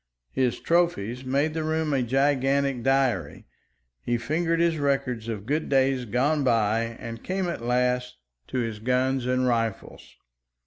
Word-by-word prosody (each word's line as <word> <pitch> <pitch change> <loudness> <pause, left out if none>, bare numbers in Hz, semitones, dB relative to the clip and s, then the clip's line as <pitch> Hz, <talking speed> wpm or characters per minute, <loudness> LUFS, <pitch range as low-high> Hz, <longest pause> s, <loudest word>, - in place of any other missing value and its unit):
His 125 -3 0
trophies 130 - 0
made 140 +4 0
the 160 0 -2
room 155 -1 0
a 135 - +2
gigantic 135 +1 +1
diary; 130 - 0 0.6
he 120 - 0
fingered 165 +8 0
his 170 -2 +2
records 135 -5 -1
of 105 -3 -4
good 150 +5 -1
days 135 -2 +2
gone 140 +7 +1
by 115 -1 +1
and 115 0 -7
came 190 0 -2
at 170 - -4
last 125 +1 0 0.3
to - - -4
his 115 -3 -2
guns 130 +2 0
and 125 0 +1
rifles. 115 -4 -2
130 Hz, 145 wpm, -26 LUFS, 115-145 Hz, 0.6 s, a